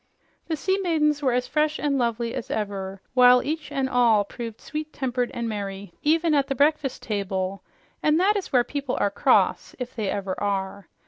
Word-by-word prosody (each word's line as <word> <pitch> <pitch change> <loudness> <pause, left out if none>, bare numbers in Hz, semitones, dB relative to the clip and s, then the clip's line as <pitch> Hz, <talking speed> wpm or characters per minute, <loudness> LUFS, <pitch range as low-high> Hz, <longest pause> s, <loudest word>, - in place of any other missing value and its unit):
The 320 - -1
sea 380 +6 0
maidens 305 -5 +1
were 265 -3 +2
as 250 +1 +1
fresh 305 +2 +1
and 290 -1 0
lovely 235 -2 -1
as - - -5
ever, 195 -2 -4
while 250 -1 +6
each 305 0 -4
and 270 -2 0
all 240 -5 +4
proved 230 +1 -7
sweet 305 0 -6
tempered 250 -3 -1
and 235 -1 -3
merry, 200 -3 -5
even 320 +1 +2
at 280 -2 +2
the 275 - -2
breakfast 285 0 +1
table 195 -2 -2 0.4
and 305 +2 +3
that 400 +3 +3
is 395 -3 -3
where 250 -2 +4
people 280 0 -3
are 200 - +1
cross, - - +2
if 250 -1 -6
they 215 -5 -2
ever 195 -2 -2
are. 200 -1 -2
250 Hz, 190 wpm, -25 LUFS, 205-300 Hz, 0.4 s, while